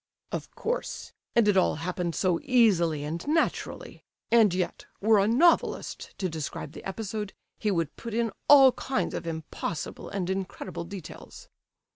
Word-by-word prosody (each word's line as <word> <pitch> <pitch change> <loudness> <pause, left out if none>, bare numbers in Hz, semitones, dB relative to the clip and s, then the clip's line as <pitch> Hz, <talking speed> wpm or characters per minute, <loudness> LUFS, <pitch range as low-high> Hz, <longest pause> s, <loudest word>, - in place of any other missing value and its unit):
"Of - - -4
course; 485 +2 -3 0.2
and 235 -3 +5
it 205 - +4
all 190 - +3
happened 175 +1 -3
so 180 -3 +1
easily 190 - +3
and 160 +3 -4
naturally. 320 +2 -1 0.3
And 225 -4 +6
yet, 180 0 -3
were 215 0 +4
a 195 - +3
novelist 305 +10 +2
to 190 - -1
describe 155 -3 -5
the - - -10
episode, 210 +1 -4 0.3
he 215 - 0
would 165 -6 -1
put 230 -2 -6
in 230 -1 +1 0.2
all 275 -2 +9
kinds 265 +1 -2
of - - -4
impossible 160 -1 -5
and 190 -3 -3
incredible 190 -2 -4
details." 195 -3 -10
195 Hz, 150 wpm, -28 LUFS, 170-230 Hz, 0.3 s, all